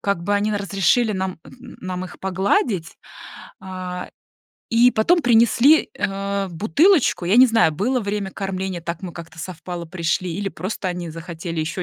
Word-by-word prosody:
как 200 -4 -1
бы 205 +4 0
они 205 +1 +1
на 205 - 0
разрешили 200 +3 +2
нам 190 -2 -3
нам 185 -7 -7
их 185 - -11
погладить, 190 -1 0 0.6
а, 185 -1 -6 0.6
и 235 +2 +5
потом 340 +11 +3
принесли, 240 +5 +4
э, 195 0 -2
бутылочку. 245 - +3
Я 185 - +3
не 255 +1 +9
знаю, 225 -9 +3
было 235 - 0
время 205 -2 -3
кормления, 190 -2 -4
так 170 +1 -5
мы 180 -2 -6
как-то 165 -1 -11
совпало, 175 0 -6
пришли 170 +1 -2
или 200 0 -2
просто 190 +1 -4
они 175 -2 -4
захотели 165 0 -5
ещё 175 +4 -3
190 Hz, 155 wpm, -21 LUFS, 175-215 Hz, 0.6 s, не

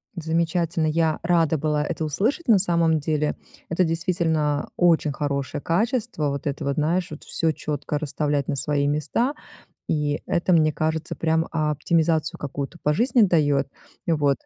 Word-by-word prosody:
Замечательно, 165 -1 0
я 160 0 +1
рада 165 -2 +2
была 150 0 0
это 160 +1 -3
услышать 220 - -1
на 225 -4 +6
самом 170 -4 +2
деле. 150 0 -1 0.3
Это 170 +3 +2
действительно 160 -3 0
очень 165 -4 +3
хорошее 140 0 -3
качество, 215 - 0
вот 140 +1 -4
это 140 0 -3
вот, 140 0 0
знаешь, 165 +4 +1
вот 150 - -9
всё 165 -1 0
четко 150 -1 -3
расставлять 145 -1 -1
на - - -1
свои 140 +1 0
места, 155 - 0 0.6
и 150 -1 0
это, 175 +2 +1
мне 155 -2 +4
кажется, 160 +1 -2
прям 160 0 +1
оптимизацию 160 +1 +1
какую-то 140 +3 -5
по 150 - +2
жизни 240 - +3
дает. 145 -7 +2 0.4
Вот, 145 -5 +2
155 Hz, 150 wpm, -24 LUFS, 150-170 Hz, 0.6 s, на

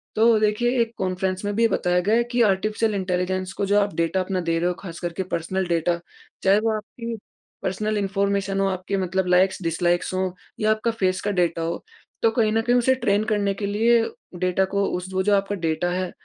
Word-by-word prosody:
तो 225 +1 +5
देखिए 240 +4 +1
एक 230 0 -1
कॉन्फ्रेंस 185 0 -2
में 205 - -1
भी 230 +1 +4
बताया 180 -4 +1
गया 215 +2 +3
है 235 - +3
कि 245 0 +2
आर्टिफिशियल 215 +2 +1
इंटेलिजेंस 185 0 -1
को 200 - +1
जो 205 +1 +3
आप 205 0 0
डाटा 170 +3 +1
अपना 185 0 -1
दे 165 0 +2
रहे 175 - +1
हो 180 - +1
ख़ास 170 -4 -8
करके 175 +1 -3
पर्सनल 185 +3 -1
डाटा। 170 0 +1 0.4
चाहे 195 +2 +5
वो 225 +1 +1
आपकी 230 +2 -6 0.5
पर्सनल 210 +3 -1
इन्फॉर्मेशन 200 0 0
हो 195 - +2
आपके 185 +1 -2
मतलब 190 0 0
लाइक्स-डिसलाइक्स 180 -1 +1
हों 185 0 0 0.3
या 215 0 +3
आपका 215 +2 +1
फेस 185 -4 0
का - - +2
डाटा 175 -3 0
हो। 165 +1 -3 0.4
तो 225 - +5
कहीं 225 -2 +2
न 225 - +2
कहीं 240 +2 +2
उसे 245 +2 +3
ट्रेन 215 -5 +1
करने 205 -2 +1
के 200 +1 -4
लिए 225 +4 +3 0.4
डाटा 185 +1 +2
को 200 0 +2
उस 180 +1 -6
वो 190 - +1
जो 205 +1 +3
आपका 200 +1 0
डाटा 165 +2 0
है 185 0 -2
195 Hz, 210 wpm, -23 LUFS, 180-215 Hz, 0.5 s, तो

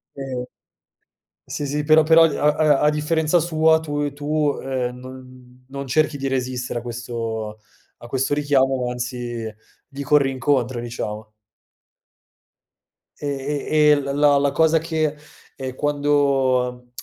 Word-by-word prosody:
Ehm 130 -2 -5 1.0
Sì, 145 - -4
sì, 150 +1 -2
però 155 +1 +6
però 165 +1 +6
a 150 -1 +2
a 150 -3 +3
a 150 - +4
differenza 155 +2 +1
sua 160 -1 +3
tue 145 -2 -3
tu, 150 0 -1
ehm, 125 -2 -2
non 130 0 -13
non 140 +1 -6
cerchi 155 +1 +1
di 135 0 -3
resistere 125 -2 -2
a - - -10
questo 115 -3 -5 0.4
a 120 - -12
questo 135 +3 -1
richiamo, 135 -3 +1
anzi 120 -2 -4 0.4
gli 140 0 -8
corri 140 -1 +3
incontro, 130 -1 0
diciamo. 110 -2 -6 1.9
E - - -5 0.4
e 150 -1 +4
e - - +6
l 145 - -2 0.2
la 145 -1 +5
la 140 0 +2
cosa 160 0 +3
che, 155 -2 -1 0.4
ehm, 130 -1 -6
quando, 135 -4 +1
135 Hz, 135 wpm, -22 LUFS, 125-150 Hz, 1.9 s, però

